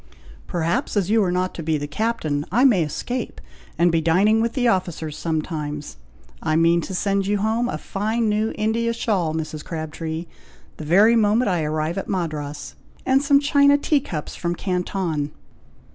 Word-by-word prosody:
"Perhaps, 170 +3 -1
as 200 0 +1
you 220 -1 +4
are 180 - 0
not 185 +1 -1
to - - -6
be 160 -1 0
the 145 - -4
captain, 155 -5 -1
I 240 +6 +3
may 235 -10 +5
escape, 225 - -3 0.4
and 170 +1 +4
be 165 -1 +2
dining 195 +7 +3
with 230 0 0
the 250 -3 +1
officers 175 -7 -1
sometimes! 150 -2 -4 0.4
I 155 -1 0
mean 165 +1 +4
to 190 +3 -5
send 195 +1 0
you 205 +1 +1
home 220 +4 0
a - - -3
fine 220 +3 -1
new 215 +1 +1
India 230 +2 0
shawl, 190 -9 -1
Mrs. 155 -1 -4
Crabtree, 160 0 -5 0.5
the 155 - -7
very 205 +9 +5
moment 220 +1 +3
I 175 -3 +1
arrive 155 +3 -1
at - - -7
Madras, 150 -5 -3 0.3
and 265 +1 +3
some 280 -1 +4
china 285 0 +4
tea 290 0 +2
cups 155 - -6
from 170 0 -2
Canton." 180 -5 -2
180 Hz, 175 wpm, -22 LUFS, 160-220 Hz, 0.5 s, may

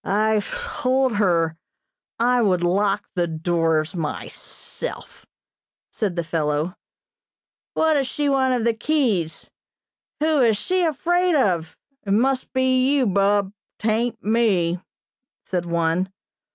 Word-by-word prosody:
"I 215 +1 +2
told 265 - 0
her 165 -5 +1 0.6
I 245 +1 +3
would 185 -5 +2
lock 195 +3 +1
the 175 -2 0
doors 160 -1 0
myself," 165 - -7 0.6
said 200 -6 -2
the 170 - -1
fellow. 155 0 -1 1.0
"What 320 0 +3
does 275 -3 +1
she 290 +3 -1
want 260 -4 +2
of 225 -1 0
keys? 220 - 0 0.7
Who 310 0 +2
is 230 -5 +4
she 370 - 0
afraid 350 +2 +1
of? 170 - 0 0.3
It 195 - -1
must 260 +4 +1
be 260 0 +2
you, 270 -3 +2
Bub; 200 0 +2 0.2
'tain't 225 +2 -1
me," 195 -6 +1 0.6
said 175 -2 -2
one. 170 +2 0
210 Hz, 115 wpm, -22 LUFS, 175-260 Hz, 1.0 s, is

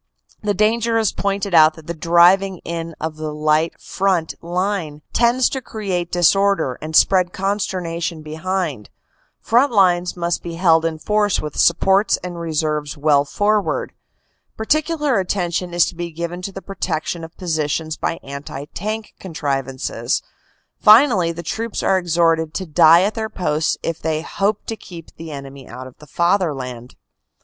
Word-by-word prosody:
The 205 -1 -1
danger 225 +3 +2
is 220 -3 +2
pointed 200 -1 -2
out 155 -1 +6
that 160 - -14
the 170 - -4
driving 175 +4 +4
in 165 -1 -5
of 155 0 -4
the 155 -1 -4
light 155 +2 0
front 185 -4 -1
line 175 -3 -3
tends 240 +2 +3
to 265 - -4
create 190 -7 -4
disorder 180 -5 +2
and 155 +1 -5
spread 185 0 +4
consternation 175 -5 -2
behind. 155 - -3 0.5
Front 245 +5 +3
lines 180 -4 +2
must 170 0 -1
be 170 -1 -6
held 165 -2 +3
in 165 -1 -1
force 210 +3 +1
with 150 -2 -6
supports 195 +4 +3
and 175 -1 -6
reserves 155 -3 -2
well 145 -1 +3
forward. 205 +6 0 0.6
Particular 300 +1 +1
attention 180 -1 -2
is 175 -1 +3
to - - -6
be 175 0 -4
given 170 +2 -5
to 195 - -5
the 195 0 -9
protec 175 -5 -3
tion 170 -1 -4
of 165 +1 -11
positions 160 -2 -2
by 165 - -3
anti 140 0 -7
tank 215 +3 -4
contrivances. 135 -7 -3 0.6
Finally 215 -6 +6
the 170 +1 -7
troops 225 +7 -4
are 190 - +3
exhorted 165 -2 +1
to 190 - -3
die 160 +2 +6
at 205 +2 0
their 220 -1 -3
posts 160 -6 -1
if 165 -1 -3
they 160 0 -1
hope 200 +3 -1
to 225 - -4
keep 170 -6 -12
the 165 0 -8
enemy 140 -2 -9
out 130 - -9
of 130 - -14
the 150 - -15
Fatherland. 140 -9 -1
170 Hz, 155 wpm, -20 LUFS, 155-195 Hz, 0.6 s, out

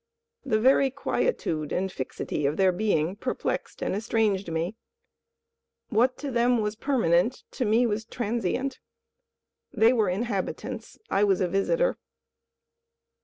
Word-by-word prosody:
The 220 -5 +1
very 265 +3 +5
quietude 245 - -1
and 190 +1 -1
fixity 140 +1 -3
of 145 - -1
their 190 -1 +4
being 180 -3 0
perplexed - - -3
and - - -1
estranged 210 -3 0
me. 165 +6 -2 1.1
What 245 +3 +2
to 285 -2 -5
them 240 0 +3
was 210 0 -1
permanent, 230 - +1
to 255 - -2
me 225 +3 +3
was 220 -1 -1
transient. 240 +3 -2 0.9
They 225 +3 +4
were 220 -6 +2
inhabitants: 200 0 -3
I 200 - +3
was 195 -3 +3
a 185 - +2
visitor. - - +1
215 Hz, 125 wpm, -27 LUFS, 185-245 Hz, 1.1 s, very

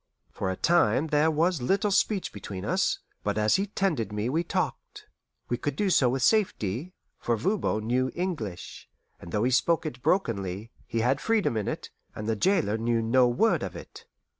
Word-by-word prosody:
For 95 - -3
a 95 - -1
time 165 - +3
there 150 +1 +3
was 160 0 +1
little 195 +10 +1
speech 200 0 +1
between 95 -2 -7
us, - - +1 0.3
but 105 0 -1
as 105 0 +3
he 200 +2 -1
tended 165 - -1
me 105 +3 -2
we 160 +6 0
talked. - - -3 0.4
We 120 - -1
could 145 +2 -3
do 195 +4 +1
so 130 -7 +4
with 130 0 -1
safety, 180 - +1 0.2
for 120 -1 0
Voban 115 - 0
knew 130 +3 +1
English; 155 - -5 0.3
and 85 - -10
though 105 +3 0
he 125 - +2
spoke 165 +6 +2
it 125 -5 -5
brokenly, 110 - -1 0.2
he 115 -1 -1
had 130 +4 +1
freedom 220 - +1
in 105 -2 -2
it, - - -4 0.2
and 105 - -5
the 110 - +1
jailer 130 - +1
knew 115 0 +1
no 125 +2 +4
word 170 - +2
of - - -5
it. - - -11
125 Hz, 190 wpm, -27 LUFS, 110-175 Hz, 0.4 s, so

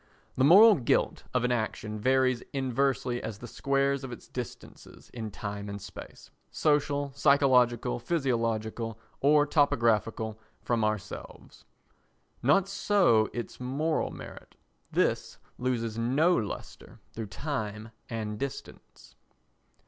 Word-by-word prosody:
The 130 - +2
moral 205 +10 +9
guilt 125 - 0
of 125 -2 0
an 125 - +1
action 110 -2 -2
varies 130 +1 +2
inversely 130 -2 0
as 110 - -5
the 120 - -9
squares 140 +2 0
of 130 - -6
its 120 - -10
distances 125 -2 -9
in 110 -3 -5
time 100 0 -6
and 100 0 -5
space, - - -11 0.2
social, 145 -1 +1
psychological, 125 - +3
physiological 115 -6 -1 0.2
or 145 +1 +4
topographical, 115 -7 +1 0.2
from 115 -2 0
ourselves. 110 -1 -5 0.8
Not 165 +9 +3
so 190 - +3
its 120 - -6
moral 140 +6 -1
merit: - - -11 0.4
this - - 0 0.2
loses 115 -3 -1
no 145 +10 +3
lustre 105 -3 -6
through 110 -1 -5
time 110 -3 -4 0.2
and 110 -3 -4
distance. 140 -1 -8
125 Hz, 115 wpm, -29 LUFS, 110-140 Hz, 0.8 s, moral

